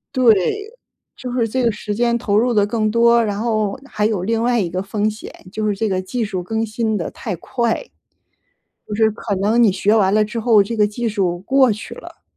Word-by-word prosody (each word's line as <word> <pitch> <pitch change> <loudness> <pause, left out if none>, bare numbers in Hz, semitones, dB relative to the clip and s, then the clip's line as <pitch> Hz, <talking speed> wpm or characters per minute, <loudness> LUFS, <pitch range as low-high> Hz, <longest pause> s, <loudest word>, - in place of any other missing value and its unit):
对， 250 -3 +6 0.8
就 250 - -7
是 240 -2 0
这 255 +3 -1
个 235 - +3
时 210 0 -5
间 235 +2 +1
投 205 -3 -1
入 245 +3 +2
得 205 -2 +3
更 215 0 0
多， 235 +1 +4
然 205 -1 -2
后， 215 0 -1
还 210 -6 -2
有 205 -5 -2
另 225 +2 0
外 240 0 +2
一 190 - 0
个 180 +2 -3
风 205 +2 -1
险， 215 +1 -8 0.2
就 215 +1 -2
是 210 - +1
这 220 +2 -1
个 185 -2 -1
技 225 +6 -3
术 190 -3 -4
更 220 +5 -2
新 220 -1 -1
得 170 - -3
太 200 -6 -5
快。 235 - -2 1.0
就 210 - -4
是 220 +1 +3
可 215 -1 -4
能 210 +5 +1
你 215 -5 +5
学 200 +3 +2
完 200 -3 +3
了 215 0 +4
之 215 +2 -5
后， 220 -3 +5
这 230 +4 -5
个 210 -1 +4
技 230 +3 -3
术 185 -5 -1
过 260 +3 +3
去 210 - -8
了。 - - -13
215 Hz, 245 characters per minute, -19 LUFS, 205-235 Hz, 1.0 s, 对